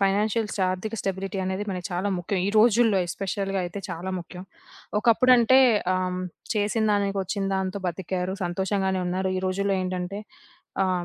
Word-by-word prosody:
Financial 210 +3 +2 0.2
ఆర్థిక 200 +4 -4
stability 195 +1 -3
అనేది 190 +2 -2
మనకి 180 -2 -4
చాలా 185 +3 -1
ముఖ్యం. 180 +3 -2
ఈ - - +1
రోజుల్లో 225 -2 +5
ఎస్పెషల్‌గా 195 +2 -2
అయితే 175 +3 -5
చాలా 185 +2 -4
ముఖ్యం. 180 +1 -9 0.6
ఒకప్పుడంటే 245 +2 +5 0.4
ఆహ్, - - +1
హ్మ్, 180 - -3 0.3
చేసినదానికొచ్చిన 205 -2 0
దాంతో 190 +1 -2
బతికారు, 180 +1 -2
సంతోషంగానే 190 +1 0
ఉన్నారు. 185 +1 -1
ఈ - - -2
రోజుల్లో 195 +1 0
ఏంటంటే, 185 +1 -3 0.7
ఆహ్, 180 -2 0
195 Hz, 135 wpm, -25 LUFS, 185-205 Hz, 0.7 s, రోజుల్లో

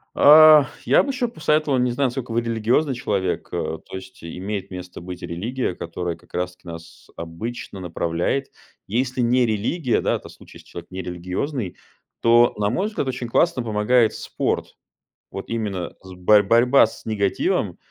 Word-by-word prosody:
А, 155 -1 +8 0.2
я - - +5
бы - - -4
ещё 255 -2 -1
посоветовал- 155 - +1
не 125 0 +1
знаю, 135 +3 +1
насколько 125 -1 -5
вы 120 - +2
религиозный 115 +5 +1
человек,- 100 -7 -2
э, 80 - -3
то - - -10
есть 95 -1 -10
имеет 95 +4 -5
место 90 -1 -8
быть 90 0 -8
религия, 110 +7 -3
которая 85 0 -4
как 85 - -24
раз 90 0 -2
таки 90 - -21
нас 85 0 -11
обычно 95 +6 -7
направляет. 85 +8 -2 0.4
Если 125 +4 -1
не 125 +1 +3
религия, 115 - 0
да, - - +1
это - - -8
в - - -12
случае, - - -15
если - - -18
человек - - -10
нерелигиозный, 90 - -4 0.4
то, 120 +1 +5
на 105 -1 +1
мой 185 - 0
взгляд, 210 -10 -3
очень 125 -2 -3
классно 130 +2 +2
помогает 110 +1 +2
спорт. - - -3 0.6
Вот 95 - -7
именно 105 -6 -3
з 95 -1 -12
борь 105 +3 +5
борьба 120 +4 +5
с - - -13
негативом, 100 -3 0
110 Hz, 170 wpm, -22 LUFS, 90-125 Hz, 0.6 s, А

